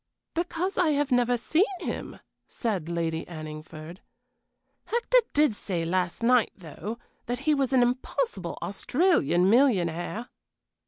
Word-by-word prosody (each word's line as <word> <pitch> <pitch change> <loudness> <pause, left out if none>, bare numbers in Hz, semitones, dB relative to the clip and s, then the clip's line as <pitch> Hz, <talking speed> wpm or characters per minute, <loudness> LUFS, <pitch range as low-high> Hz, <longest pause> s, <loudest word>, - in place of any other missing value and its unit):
"Because 355 +3 -2
I 325 -4 +3
have 285 -1 0
never 245 0 +3
seen 315 +9 +2 0.2
him," - - -5 0.3
said 195 -9 -2
Lady 165 -1 -1
Anningford. 155 +1 -8 0.9
"Hector 480 +2 +3
did 295 -4 +4
say 180 -5 -2
last 180 +4 -1
night, 245 0 +4
though, 185 +5 -7 0.3
that 245 +2 -2
he 305 +1 +2
was 275 -3 +1
an 255 -2 +5
impossible 255 - -2
Australian 245 - +2
millionaire." 205 - +2
235 Hz, 120 wpm, -27 LUFS, 170-285 Hz, 0.9 s, an